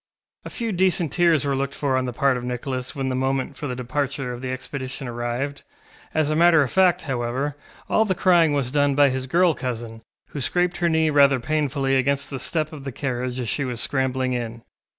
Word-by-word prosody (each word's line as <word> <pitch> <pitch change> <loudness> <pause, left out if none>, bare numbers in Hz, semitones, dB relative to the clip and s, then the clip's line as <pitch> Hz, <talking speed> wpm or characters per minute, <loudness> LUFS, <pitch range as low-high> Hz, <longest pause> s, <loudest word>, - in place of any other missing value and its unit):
A - - -5
few 230 -2 -3
decent 180 -4 +1
tears 170 -4 +3
were 140 -1 +1
looked 140 +1 -2
for 140 -3 0
on 130 0 +1
the 125 - -3
part 140 +1 +2
of 125 - -4
Nicholas 125 +2 -4
when 135 -1 -2
the 130 - -1
moment 135 +1 -1
for 145 - -5
the 125 - -3
departure 130 +1 -3
of 120 - -8
the 130 - -4
expedition 130 +1 -5
arrived. 120 +4 -3 0.5
As 155 -1 +1
a - - +1
matter 165 -1 +6
of 130 - -4
fact, 185 -2 +4
however, 130 +2 -2 0.3
all 220 - +3
the 195 -4 0
crying 170 -4 +4
was 140 -4 0
done 145 -1 +2
by 145 -1 +5
his 130 0 -3
girl 175 +4 +3
cousin, 120 -3 -5 0.3
who 145 - -5
scraped 175 +5 0
her 170 -1 +1
knee 160 -1 +2
rather 140 -2 +5
painfully 140 -1 0
against 140 +2 0
the 135 - -4
step 155 +1 -2
of 145 -3 -8
the 135 - -5
carriage 125 -1 -3
as 125 - -3
she 140 - -1
was 125 -3 -4
scrambling 130 -1 0
in. 115 -1 -4
135 Hz, 215 wpm, -23 LUFS, 125-150 Hz, 0.5 s, matter